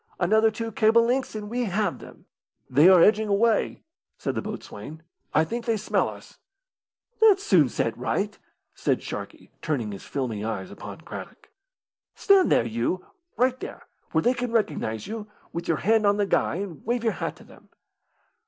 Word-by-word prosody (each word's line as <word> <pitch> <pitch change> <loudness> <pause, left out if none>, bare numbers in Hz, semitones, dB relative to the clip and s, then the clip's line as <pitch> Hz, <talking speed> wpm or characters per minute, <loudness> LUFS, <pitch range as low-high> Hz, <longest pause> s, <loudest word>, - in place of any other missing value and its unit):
Another 220 +5 +4
two 225 +1 -5
cable 220 +2 +4
lengths 255 0 0
and 210 -1 -5
we 240 +3 -1
have 200 -1 -1
them." - - -14 0.4
"They 145 +8 +6
are 180 -3 +7
edging 215 0 +4
away," 215 +3 +1 0.3
said - - -2
the - - -2
boatswain. 160 +1 -8 0.3
"I 155 - +4
think 230 +8 -4
they 230 -2 +1
smell 215 - 0
us." - - -13 0.8
"That's 405 -3 +6
soon 160 - +4
set 115 -1 -1
right," 195 - -2 0.4
said - - -1
Sharkey, - - -7
turning 125 -9 -2
his 100 - -8
filmy 120 -7 -3
eyes 110 -4 -4
upon - - -9
Craddock. - - -10 0.6
"Stand 395 -2 +4
there, - - +4
you 115 +11 -2 0.3
right 255 +1 +2
there, - - -8 0.3
where 160 - +2
they 245 - +4
can 245 -1 -3
recognise 150 - -1
you, 220 -1 -6 0.3
with 170 0 -4
your 165 - +1
hand 215 +2 +3
on 200 0 +3
the 205 - +2
guy, 195 - +1
and 180 -4 -6
wave 240 0 -1
your 225 - +1
hat - - -4
to - - -16
them. - - -18
205 Hz, 175 wpm, -25 LUFS, 155-230 Hz, 0.8 s, are